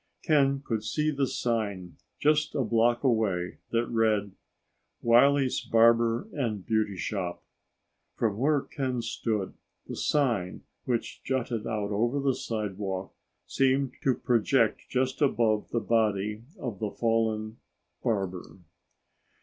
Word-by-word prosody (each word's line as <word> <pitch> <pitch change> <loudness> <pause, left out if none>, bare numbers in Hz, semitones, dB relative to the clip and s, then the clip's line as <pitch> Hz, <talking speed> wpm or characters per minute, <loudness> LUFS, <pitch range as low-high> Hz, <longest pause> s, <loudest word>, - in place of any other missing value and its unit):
Ken 140 -4 +3
could 110 -2 -2
see 155 +6 0
the 140 -2 0
sign, 100 -10 -2 0.2
just 150 0 +2
a 135 - +1
block 120 +2 +2
away, 105 -8 0
that 115 0 +1
read, 110 -3 +1 0.7
"Wiley's 130 +3 +4
Barber 115 - +3
and 110 -9 -2
Beauty 110 -3 0
Shop." 90 -3 -3 0.7
From 110 -2 -1
where 145 +2 +3
Ken 130 -4 -3
stood, 105 -5 -2 0.3
the - - -5
sign, 120 -12 0 0.2
which 120 -2 -2
jutted 120 -4 -2
out 105 -2 -2
over 120 +7 +1
the 135 -1 +2
sidewalk, 100 -5 -4 0.3
seemed 135 0 +1
to 130 -2 +2
project 120 0 +1
just 130 +2 -1
above 115 -6 +2
the 120 - 0
body 105 -1 0
of 115 - -5
the 105 - -1
fallen 110 -1 0 0.4
barber. 95 -7 -2
115 Hz, 120 wpm, -28 LUFS, 105-130 Hz, 0.7 s, Wiley's